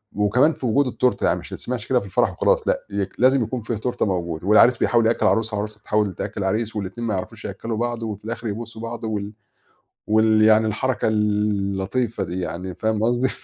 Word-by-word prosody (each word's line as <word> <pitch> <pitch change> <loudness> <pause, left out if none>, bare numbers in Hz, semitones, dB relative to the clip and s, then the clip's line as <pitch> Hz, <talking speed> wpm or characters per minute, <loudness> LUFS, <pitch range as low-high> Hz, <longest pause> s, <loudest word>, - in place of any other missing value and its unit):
وكمان 120 - +3
في 130 - -7
وجود 130 +4 +2
التورتة، 125 -3 0
يعني - - +1
مش - - -11
تتسمعش 120 -3 -5
كده 130 - +3
في 100 - -9
الفرح 100 - +1
وخلاص - - +1
لأ، - - 0
ي 100 -1 -1
لازم 130 +1 +4
يكون 120 +2 -4
فيها 110 +1 -3
تورتة 120 +3 -1
موجودة 85 -3 -3
والعريس 115 +3 +6
بيحاول 115 0 +2
يأكّل 115 - +1
العروسة 110 0 +2
والعروسة 105 +1 -4
بتحاول 105 -2 0
تأكّل - - -5
العريس، 110 +4 -1
والاتنين 105 +4 -4
ما 110 - 0
يعرفوش 95 - -6
يأكّلوا 115 -1 -4
بعض، 120 0 -2
وفي 105 -2 -5
الآخر 115 +1 -4
يبوسوا 110 +1 -6
بعض، 115 0 -6
وال 105 -2 -3 0.7
وال 110 0 +4
يعني 110 0 +5
الحركة 110 +1 -1
اللطيفة 105 +1 0
دي 90 +2 -4
يعني 90 +2 -5
فاهم 110 -1 -1
قصدي. 120 +3 +2
110 Hz, 195 wpm, -22 LUFS, 100-120 Hz, 0.7 s, والعريس